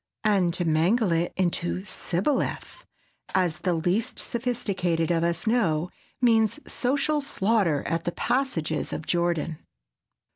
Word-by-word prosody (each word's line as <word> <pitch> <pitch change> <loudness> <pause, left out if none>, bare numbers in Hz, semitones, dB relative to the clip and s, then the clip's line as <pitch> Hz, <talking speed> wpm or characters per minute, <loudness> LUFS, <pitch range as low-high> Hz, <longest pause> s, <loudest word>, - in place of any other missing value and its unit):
And 195 -5 +3
to 175 - -1
mangle 175 +7 +2
it 165 +1 +1
into 180 0 -1
"sibboleth"—as 190 - -3
the 180 -2 0
least 180 +9 0
sophisticated 190 -9 -1
of 165 -1 +2
us 170 +3 0
know—means 220 - +1
social 285 +4 0
slaughter 200 - +1
at 165 0 -2
the 175 - 0
passages 240 - -1
of 155 - -4
Jordan. 170 -2 0
180 Hz, 110 wpm, -26 LUFS, 170-230 Hz, -, And